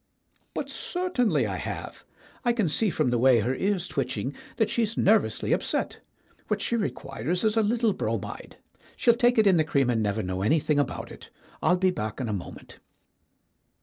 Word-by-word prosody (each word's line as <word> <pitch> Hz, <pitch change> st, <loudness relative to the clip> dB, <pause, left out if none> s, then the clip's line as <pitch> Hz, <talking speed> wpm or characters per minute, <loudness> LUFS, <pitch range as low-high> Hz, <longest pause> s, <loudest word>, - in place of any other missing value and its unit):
"But -, -, -2 dB
certainly 355 Hz, -, 0 dB
I -, -, -3 dB
have. -, -, -6 dB, 0.4 s
I 240 Hz, -1 st, +3 dB
can 220 Hz, -6 st, +1 dB
see 205 Hz, +8 st, +1 dB
from 125 Hz, -, 0 dB
the 120 Hz, -, +1 dB
way 125 Hz, -2 st, +5 dB
her 120 Hz, +5 st, 0 dB
ear's 190 Hz, +4 st, -1 dB
twitching 135 Hz, -2 st, -2 dB, 0.2 s
that 220 Hz, -, +3 dB
she's 225 Hz, -2 st, 0 dB
nervously 215 Hz, +2 st, +2 dB
upset. -, -, -1 dB, 0.5 s
What -, -, 0 dB
she 235 Hz, -, 0 dB
requires 165 Hz, -, -2 dB
is 215 Hz, 0 st, +2 dB
a 225 Hz, -, +4 dB
little 225 Hz, 0 st, +2 dB
bromide. -, -, -4 dB, 0.4 s
She'll 235 Hz, -, +5 dB
take 240 Hz, +1 st, +2 dB
it 220 Hz, -, +5 dB
in 190 Hz, -3 st, +5 dB
the 160 Hz, -, +4 dB
cream 140 Hz, -5 st, +1 dB
and 115 Hz, -2 st, +1 dB
never 105 Hz, +1 st, -1 dB
know 95 Hz, 0 st, -3 dB
anything 150 Hz, +6 st, +2 dB
about 145 Hz, -, -2 dB
it. -, -, -12 dB, 0.3 s
I'll 180 Hz, -, +3 dB
be 185 Hz, 0 st, +2 dB
back 110 Hz, -10 st, -4 dB
in 130 Hz, -, -2 dB
a 105 Hz, -, -2 dB
moment." 95 Hz, -, -8 dB
175 Hz, 180 wpm, -26 LUFS, -, 0.5 s, way